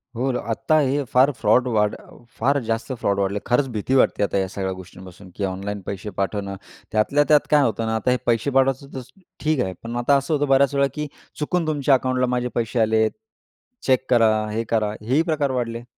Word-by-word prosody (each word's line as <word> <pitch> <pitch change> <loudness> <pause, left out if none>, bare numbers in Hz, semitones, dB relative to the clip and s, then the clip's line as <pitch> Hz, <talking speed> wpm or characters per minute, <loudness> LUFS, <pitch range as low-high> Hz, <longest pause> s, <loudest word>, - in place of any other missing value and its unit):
हो, 130 +3 0
आता 115 +7 0
हे 140 -1 +1
फार 130 +3 +5
फ्रॉड 125 0 +2
वाढ 105 -1 +2 0.4
फार 140 +5 +2
जास्त 115 +3 -3
फ्रॉड 100 -5 -1
वाढले. 100 +1 0
खरंच 130 +3 +2
भीती 110 +5 0
वाटते 130 - +3
आता 100 - 0
या 95 -1 0
सगळ्या 95 0 -3
गोष्टींपासून, 95 +1 -12
की 100 - -4
ऑनलाईन 100 +2 -4
पैसे 100 +1 -5
पाठवणं. 100 0 -2 0.4
त्यातल्या 110 +7 +2
त्यात 150 -1 +4
काय 150 -1 +6
होतं 115 -2 -1
ना, 110 0 -1
आता 110 +3 0
हे 125 - +2
पैसे 115 +2 +1
पाठवायचं 135 +1 +1
तर 130 - -5 0.4
ठीक 155 -2 +1
आहे. 95 - -4
पण 115 +1 -5
आता 120 +4 +3
असं 140 +3 -2
होतं 145 -1 +1
बर्‍याच 135 0 +3
वेळा, 140 0 +3
की 150 +1 -4 0.3
चुकून 165 +2 -1
तुमच्या 145 -3 +3
अकाउंटला 130 0 0
माझे 125 0 -1
पैसे 115 +1 -1
आलेत, 110 0 +3 0.8
चेक 130 -1 +3
करा, 115 -3 +5 0.2
हे 110 +2 -1
करा. 110 -2 +1
हेही 130 +8 +2
प्रकार 145 -3 0
वाढले. 120 -2 -3
120 Hz, 200 wpm, -22 LUFS, 105-140 Hz, 0.8 s, काय